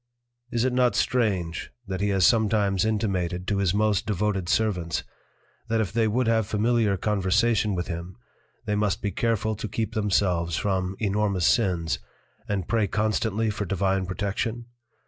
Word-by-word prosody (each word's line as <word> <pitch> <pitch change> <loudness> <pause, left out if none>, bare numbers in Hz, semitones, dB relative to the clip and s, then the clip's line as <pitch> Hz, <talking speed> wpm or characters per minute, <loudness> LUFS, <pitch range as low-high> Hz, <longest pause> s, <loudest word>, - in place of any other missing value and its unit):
Is 120 +1 +1
it 130 - +1
not 125 -1 +3
strange, 100 -9 0 0.2
that 95 0 -4
he 105 - +1
has 95 -2 +3
sometimes 105 -4 +3
intimated 95 -5 -1
to 100 -1 0
his 95 -3 +2
most 105 -1 +1
devoted 100 -3 -1
servants, 90 -7 0 0.7
that 115 0 +1
if 105 -3 -1
they 115 -1 +2
would 120 +4 +1
have 110 -2 +2
familiar 110 -1 +1
Conversation 105 +2 +1
with 85 -1 -2
him, 85 +2 -6 0.5
they 105 - -1
must 105 -3 0
be 100 - 0
careful 110 +1 0
to 110 +2 -5
keep 110 +1 -3
themselves 95 -6 +1
from 95 -1 -1
enormous 100 -3 0
Sins, 90 -6 +1 0.5
and 95 -4 -1
pray 110 -3 +1
constantly 110 +1 0
for 105 0 -3
Divine 95 0 0
Protection? 105 +5 -2
105 Hz, 155 wpm, -25 LUFS, 95-110 Hz, 0.7 s, not